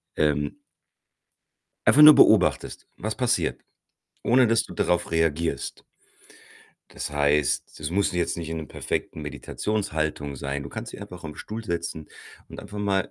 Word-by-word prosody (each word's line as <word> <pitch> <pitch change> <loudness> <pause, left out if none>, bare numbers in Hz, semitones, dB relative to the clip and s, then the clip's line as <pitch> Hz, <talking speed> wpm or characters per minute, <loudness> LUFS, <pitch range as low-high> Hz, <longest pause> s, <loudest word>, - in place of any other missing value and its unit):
ähm 75 -1 0 1.3
einfach 150 - +6
nur 150 0 +11
beobachtest, - - +3
was - - -3
passiert, - - 0 0.6
ohne 125 0 +4
dass 115 0 +2
du - - -10
darauf 90 -1 0
reagierst. 80 0 -1 1.1
Das - - -5
heißt, 75 0 0
das 75 0 -3
muss 100 +2 +1
jetzt 85 -1 -1
nicht 80 -1 -5
in 80 - -3
'nem 80 -4 -6
perfekten 80 - -4
Meditationshaltung 75 -3 -3
sein. 70 +1 -4
Du 70 - -8
kannst - - -7
dich - - -9
einfach 90 - -9
auf 80 - -5
'n 75 - -10
Stuhl 110 +6 -7
setzen 85 -4 -4 0.4
und - - -9
einfach 105 - -10
mal 100 -2 0
80 Hz, 150 wpm, -25 LUFS, 75-100 Hz, 1.3 s, nur